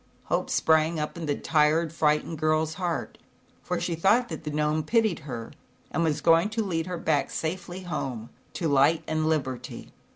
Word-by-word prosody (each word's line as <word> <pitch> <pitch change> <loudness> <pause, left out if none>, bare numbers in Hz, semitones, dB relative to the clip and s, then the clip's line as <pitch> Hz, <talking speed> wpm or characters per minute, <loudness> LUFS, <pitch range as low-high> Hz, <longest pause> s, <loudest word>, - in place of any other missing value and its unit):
Hope - - -1
sprang 160 +1 +3
up 150 - -3
in 165 -2 -5
the 145 - +1
tired 155 +2 +2
fright 150 -1 +2
ened 165 - -6
girl's 155 +1 +1
heart, 175 -1 -3 0.4
for - - -2
she 170 - -2
thought 210 +9 +3
that - - -6
the - - -2
Gnome 150 +1 0
pitied 220 +4 +1
her, 115 -2 -5 0.4
and 170 - 0
was 155 -3 0
going 165 +4 +4
to 225 - +2
lead 165 -4 -2
her 180 -1 -3
back 145 -4 0
safely 180 +3 -4
home, 130 -10 -4 0.2
to 170 - -2
light 145 +3 +3
and 155 0 0
liberty. 135 -5 -3
160 Hz, 185 wpm, -27 LUFS, 150-170 Hz, 0.4 s, going